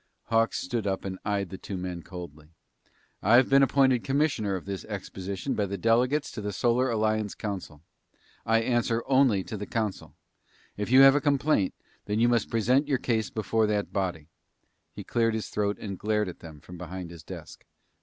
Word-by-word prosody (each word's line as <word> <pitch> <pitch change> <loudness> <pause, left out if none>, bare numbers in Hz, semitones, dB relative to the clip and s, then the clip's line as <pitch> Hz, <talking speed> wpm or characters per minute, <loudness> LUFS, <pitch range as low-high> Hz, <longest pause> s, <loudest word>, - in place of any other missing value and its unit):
Hawks 115 0 +2
stood 105 +3 -3
up 95 0 -2
and 95 -1 -5
eyed 100 -3 -1
the 95 - -7
two 100 - -6
men 90 -1 -5
coldly. 80 -4 -10 0.7
"I've 120 +5 +5
been 135 0 +7
appointed 130 -3 +3
commissioner 135 -8 0
of 90 - -6
this 100 -1 -5
exposition 100 +2 -5
by 105 -2 0
the 100 +1 -4
delegates 125 - +2
to 110 - -6
the 105 0 -3
Solar 120 +6 +1
Alliance 110 -2 0
Council. 95 -8 -6 0.6
I 115 0 +3
answer 120 -1 0
only 130 -7 +3
to 110 - -6
the 105 - -6
council. 110 -4 -3 0.6
If 105 +1 -4
you 130 +2 +7
have 135 0 +9
a 145 - +2
complaint, 140 -8 +1 0.3
then 105 +1 -1
you 120 - +4
must 120 -2 +1
present 125 +6 +2
your 140 -3 +2
case 115 -4 -1
before 110 0 0
that 105 -1 -1
body." 90 -6 -2 0.6
He - - -8
cleared 115 -1 +1
his 110 - -4
throat 105 -1 -1
and 100 -3 -6
glared 105 -1 0
at 90 - -10
them 80 -3 -12
from 90 -1 -11
behind 90 -1 -7
his 85 -2 -10
desk. - - -10
105 Hz, 185 wpm, -27 LUFS, 95-120 Hz, 0.7 s, have